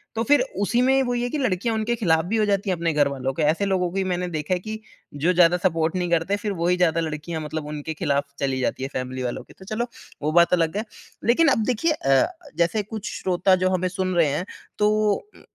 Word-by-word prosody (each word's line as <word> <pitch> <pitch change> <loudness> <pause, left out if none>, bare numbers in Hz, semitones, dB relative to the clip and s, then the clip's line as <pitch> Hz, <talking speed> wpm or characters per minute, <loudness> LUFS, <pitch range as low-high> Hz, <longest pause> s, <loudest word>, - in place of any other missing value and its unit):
तो 225 - 0
फिर 285 +1 +4 0.2
उसी 235 +4 +2
में 265 +1 +4
वही 245 -1 -1
है 245 - -1
कि 305 - -2
लड़कियाँ 230 -4 0
उनके 220 +2 0
खिलाफ 160 -8 +2
भी 220 +5 -1
हो 215 - +3
जाती 200 -1 0
है 185 - +2
अपने 165 -1 -1
घरवालों 140 -3 0
के 155 - -1
ऐसे 160 +7 +2
लोगों 190 -2 +1
को - - -11
भी 195 - +1
मैंने 180 -1 -1
देखा 155 0 -2
है 180 - 0
कि 220 +3 -6 0.3
जो 160 +6 +1
ज़्यादा 175 0 +5
सपोर्ट 165 -2 0
नहीं 180 -1 -1
करते 170 +4 +1
फिर 205 0 -3
वही 175 +1 +1
ज़्यादा 165 -2 +2
लड़कियाँ 160 +1 -4
मतलब 155 0 -5
उनके 150 +1 -5
खिलाफ 145 -3 0
चली 135 -1 -1
जाती 130 - -1
हैं 135 - -3
फैमिली 130 0 -4
वालों 125 +1 -3
के। - - -18
तो 190 - -12
चलो 220 +4 -2 0.3
वो 150 +1 0
बात 170 +1 +4
अलग 165 +1 +1
है। 220 - -2 0.4
लेकिन 275 +8 +4
अब 225 -6 +3
देखिए 255 +8 +1
अ, 135 - +3 0.3
जैसे 170 +5 +1
कुछ 210 0 -6
श्रोता 185 +1 +3
जो 185 - +3
हमें 185 0 0
सुन 185 0 -2
रहे 170 -3 +4
हैं 160 +7 -2 0.3
तो, 210 0 +3 0.2
उ - - -17
180 Hz, 245 wpm, -23 LUFS, 160-210 Hz, 0.4 s, ज़्यादा